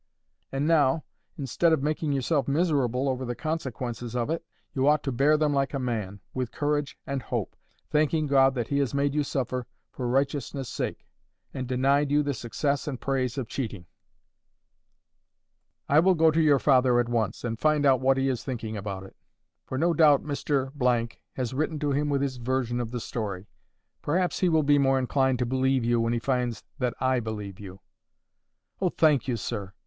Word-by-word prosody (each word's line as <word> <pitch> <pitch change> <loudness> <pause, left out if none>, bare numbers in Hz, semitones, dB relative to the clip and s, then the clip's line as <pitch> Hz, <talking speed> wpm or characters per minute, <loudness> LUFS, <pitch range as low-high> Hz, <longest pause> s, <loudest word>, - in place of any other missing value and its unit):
And 135 +2 -1
now, 155 -2 +3 0.3
instead 150 +4 +1
of 140 - +1
making 155 0 -1
yourself 140 +2 0
miserable 140 -4 +1
over 130 -1 -1
the 120 -1 -3
consequences 125 -6 -4
of 120 +4 -1
it, 165 - -2 0.3
you 135 0 +1
ought 150 0 +4
to 135 - -1
bear 140 +5 +3
them 150 -1 +1
like 140 0 0
a - - -1
man, 105 -6 -3
with 125 -2 -3
courage 145 -1 -1
and 135 -1 -3
hope, - - -3 0.4
thanking 155 +1 +2
God 135 -1 +4
that 120 -3 -2
He 140 - +1
has 140 -1 0
made 140 0 +1
you 150 - +1
suffer 130 -3 -2 0.2
for 125 - -4
righteousness' 135 0 -1
sake, - - -4 0.5
and 130 -1 -4
denied 135 +3 +2
you 145 +1 +3
the 145 0 -1
success 140 +5 -2
and 140 -3 -3
the - - -19
praise 130 -2 0
of 130 -4 -3
cheating. 110 -10 -5 2.0
I 145 - +5
will 185 +3 +4
go 160 -1 +5
to 160 +1 +2
your 150 -3 +5
father 130 -3 +4
at 120 - +1
once, 115 -4 -1
and 115 -2 -3
find 150 -1 +2
out 130 -2 +4
what 135 +1 +3
he 135 0 +1
is 130 -3 -1
thinking 115 -4 -4
about 100 -2 -5
it. 95 - -13 0.5
For 130 - -3
no 170 +4 +2
doubt 150 -3 +5
Mr— 130 -5 0 0.2
has 130 -2 -3
written 155 +3 -1
to 145 -1 -1
him 145 +2 0
with 140 -1 +1
his 130 -2 -2
version 125 0 -1
of 120 -2 -3
the 120 +1 -4
story. 100 -5 -4 0.6
Perhaps 180 +4 0
he 185 - +3
will 160 -2 +3
be 145 0 +4
more 135 -1 +3
inclined 130 0 +1
to 125 - 0
believe 130 0 +1
you 120 0 +2
when 115 0 0
he - - +1
finds 125 -3 -1 0.2
that 125 -2 -1
I 130 -1 +2
believe 105 -4 -6
you." 95 -1 -10 1.0
"Oh, 185 - +3
thank 155 -6 +2
you, 125 -3 0
sir!" 100 -3 -5
135 Hz, 195 wpm, -27 LUFS, 120-145 Hz, 2.0 s, I